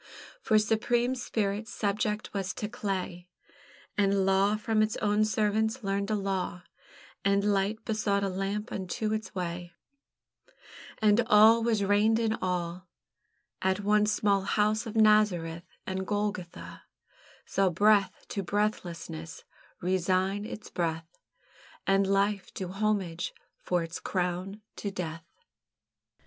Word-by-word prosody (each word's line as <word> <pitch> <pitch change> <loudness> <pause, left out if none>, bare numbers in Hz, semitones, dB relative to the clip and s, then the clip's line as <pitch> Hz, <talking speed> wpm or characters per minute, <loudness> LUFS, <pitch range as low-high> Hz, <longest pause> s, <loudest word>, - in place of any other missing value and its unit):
For 215 - +3
supreme 235 +3 +2
Spirit 220 -4 -2
subject 210 0 -2
was 195 -2 -2
to 210 - -3
clay, 190 -5 -4 0.7
And 200 -1 +2
Law 195 +2 +3
from 215 0 +1
its 215 0 +1
own 210 0 +2
servants 220 +3 0
learned 200 +1 -1
a 215 - +1
law, 190 -3 -2 0.6
And 200 0 +3
Light 205 +2 0
besought 210 -2 0
a - - +1
lamp 195 +3 -3
unto 200 +3 -2
its 220 -1 -4
way, 175 -1 -4 1.3
And 215 +2 +5
Awe 215 +2 +7
was 225 -3 +1
reined 205 +3 +3
in 225 -1 +1
awe, 180 -1 -2 0.8
At 190 +1 +1
one 210 +1 +3
small 205 -2 +2
house 215 +3 +1
of 220 - -7
Nazareth; 200 -6 +3 0.2
And 190 0 -3
Golgotha 205 -4 -3 0.6
Saw 195 -1 +2
Breath 200 +1 +3
to 200 - -2
breathlessness 175 -5 -3 0.4
resign 185 +2 +1
its 215 - -8
breath, 165 -1 -3 0.7
And 195 0 +3
Life 195 0 +1
do 185 -2 -4
homage 195 -4 -1 0.3
for 180 -2 0
its 165 +1 -6
crown 185 +3 -3
to 205 - -3
death. 165 -4 -5
200 Hz, 125 wpm, -29 LUFS, 185-215 Hz, 1.3 s, Awe